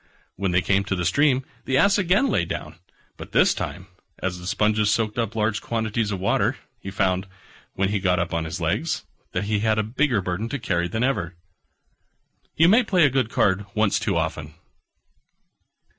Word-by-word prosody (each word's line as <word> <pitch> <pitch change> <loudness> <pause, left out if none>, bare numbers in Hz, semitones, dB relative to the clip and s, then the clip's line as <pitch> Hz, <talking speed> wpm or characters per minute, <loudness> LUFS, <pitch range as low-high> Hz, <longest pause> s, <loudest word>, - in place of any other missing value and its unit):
When 95 0 -1
they 90 0 +2
came 100 0 +2
to 95 - -1
the 90 -1 -2
stream 130 - +2 0.2
the 130 - +1
Ass 200 +7 +4
again 195 +6 +3
lay 225 - +1
down: 85 - -6 0.4
but - - -10
this - - +5
time, 85 +6 -5 0.3
as 90 -1 -3
the 90 - -8
sponges 105 +1 +2
soaked 110 +1 0
up 115 -1 -2
large 105 -1 0
quantities 110 -1 -1
of 100 -3 -3
water, 95 - +1 0.2
he 95 - -7
found, 95 -1 0 0.5
when 95 0 +1
he 105 0 0
got 90 -2 +1
up 85 -1 -2
on 85 -1 -1
his 80 +3 -5
legs, 85 - -1 0.3
that - - -1
he 105 0 0
had 110 0 +1
a 110 - +2
bigger 120 +1 +1
burden 95 +4 -3
to 145 - -2
carry 90 -8 -1
than 110 +7 -2
ever. 95 -10 -1 1.2
You 165 - +5
may 220 +7 +6
play 185 -8 +3
a 140 - +3
good 130 -4 +1
card 100 -1 +1
once 105 -1 +2
too 105 -4 -1
often. 80 -2 -3
105 Hz, 190 wpm, -23 LUFS, 90-120 Hz, 1.2 s, may